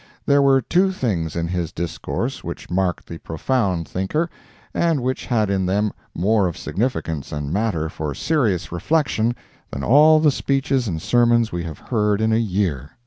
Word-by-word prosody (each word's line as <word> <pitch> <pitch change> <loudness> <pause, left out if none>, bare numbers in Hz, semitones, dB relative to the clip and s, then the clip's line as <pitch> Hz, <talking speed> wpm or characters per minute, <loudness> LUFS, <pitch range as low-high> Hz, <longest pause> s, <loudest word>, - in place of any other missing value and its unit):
There 140 0 +4
were 135 -2 +4
two 185 - +2
things 95 - -2
in 85 0 -1
his 85 -2 -2
discourse 80 -1 -4
which - - -7
marked 90 -1 0
the 85 - -8
profound 90 - -1
thinker, 150 - -1 0.4
and 165 -6 +1
which 130 +1 -2
had 110 -5 +1
in 95 -2 0
them 100 +2 +1 0.2
more 100 +2 +2
of 85 - -5
significance 80 - -2
and 75 0 -3
matter 100 -6 0
for 75 -3 -4
serious 120 - 0
reflection 120 - 0 0.3
than 70 - -5
all 155 - +6
the 155 -1 +4
speeches 135 -2 0
and 80 -5 -2
sermons 120 +3 +3
we 85 -1 -3
have 80 -3 -6
heard 105 -3 0
in 110 0 +2
a - - +3
year. 90 - -1
105 Hz, 170 wpm, -21 LUFS, 85-130 Hz, 0.4 s, all